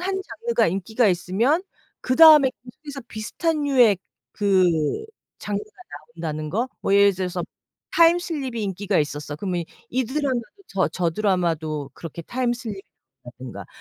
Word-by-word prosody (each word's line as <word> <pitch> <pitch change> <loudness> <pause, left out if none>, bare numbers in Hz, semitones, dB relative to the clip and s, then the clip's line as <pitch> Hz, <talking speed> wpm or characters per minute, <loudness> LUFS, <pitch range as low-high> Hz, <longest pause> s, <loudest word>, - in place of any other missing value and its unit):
1 385 +1 -2
장르가 470 +4 0
인기가 210 +6 +1
있으면 200 - +1 0.4
그다음에 300 0 +7
계속해서 275 +3 -10
비슷한 300 +8 -2
류의 245 -9 +4 0.3
그 195 -3 +3 0.7
장르가 205 -1 -3 0.5
나온다는 155 -2 -4
거. 230 +9 -1
뭐 195 - +1
예를 200 0 +6
들어서 180 -1 -3 0.5
타임 335 +1 +6
슬립이 270 -10 -4
인기가 200 0 -1
있었어. 145 0 -3
그러면 175 0 -2 0.3
이 255 +1 0
드라마도 260 -1 -1 0.3
저 190 -1 +1
저 175 -2 -1
드라마도 160 -7 -1
그렇게 165 0 -8
타임 245 +6 -1
슬립이 225 -5 -6 0.4
나온다든가. 125 0 -9
205 Hz, 325 characters per minute, -23 LUFS, 175-260 Hz, 0.7 s, 그다음에